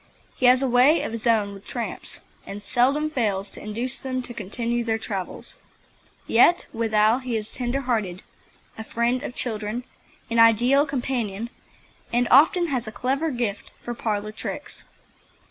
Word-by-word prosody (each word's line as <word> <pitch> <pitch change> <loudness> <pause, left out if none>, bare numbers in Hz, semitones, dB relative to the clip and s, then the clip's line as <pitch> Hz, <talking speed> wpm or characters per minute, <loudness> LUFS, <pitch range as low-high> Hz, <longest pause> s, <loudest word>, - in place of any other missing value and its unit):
He 255 - +3
has 255 +2 +6
a - - +2
way 255 +6 +5
of - - -3
his 230 +1 -3
own 210 -3 +2
with 200 0 -12
tramps, 235 -2 -5 0.2
and 205 +1 -8
seldom 275 +7 +2
fails 205 -7 -1
to - - -8
induce 235 +5 -2
them 255 -1 -3
to 240 - -7
continue 235 +3 -2
their 225 -1 0
travels. 195 -4 -6 0.7
Yet 335 +10 +5
withal 220 0 +2
he 255 -3 -3
is 215 0 -5
tender 255 +2 -2
hearted, 215 -9 -2 0.6
a - - -4
friend 235 +3 0
of 245 - -6
children, 220 0 -2 0.5
an 230 - +2
ideal 240 +6 +5
companion, 240 -5 -3 0.6
and 240 +1 +2
often 330 +6 +5
has 250 -5 -2
a - - -5
clever 270 +8 -1
gift 235 -7 -3
for 240 - -4
parlour 215 -2 -2
tricks. 215 - -6
235 Hz, 160 wpm, -24 LUFS, 215-255 Hz, 0.7 s, has